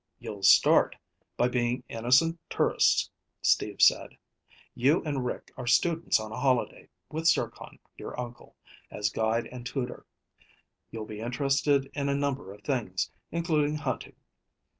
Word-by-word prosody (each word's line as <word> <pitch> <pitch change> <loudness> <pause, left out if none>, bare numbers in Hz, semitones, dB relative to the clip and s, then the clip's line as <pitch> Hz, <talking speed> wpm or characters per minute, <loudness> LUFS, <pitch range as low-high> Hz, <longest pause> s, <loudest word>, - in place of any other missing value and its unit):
"You'll 100 -2 -8
start 95 - +5 0.4
by 120 - +3
being 125 0 -1
innocent 130 +9 +2
tourists," - - +2 0.3
Steve - - +2
said. - - +4 0.6
"You 140 +8 +2
and 145 -4 -2
Rick 125 - -5
are 125 -2 -6
students 165 +7 +2
on 110 0 -7
a 110 - -5
holiday, 130 -2 0 0.2
with 160 +1 -1
Zircon, 160 - 0 0.2
your - - -7
uncle, 120 -1 -8 0.3
as 105 0 -2
guide 110 +2 0
and 125 -1 -8
tutor. 125 0 -5 0.8
You'll 110 -1 -6
be 105 -1 -8
interested 135 +3 +1
in 140 -1 -2
a 140 - +1
number 140 -8 -2
of 105 +1 -14
things, 115 -10 -2 0.2
including 155 -3 0
hunting. 145 -4 -4
125 Hz, 140 wpm, -28 LUFS, 115-145 Hz, 0.8 s, start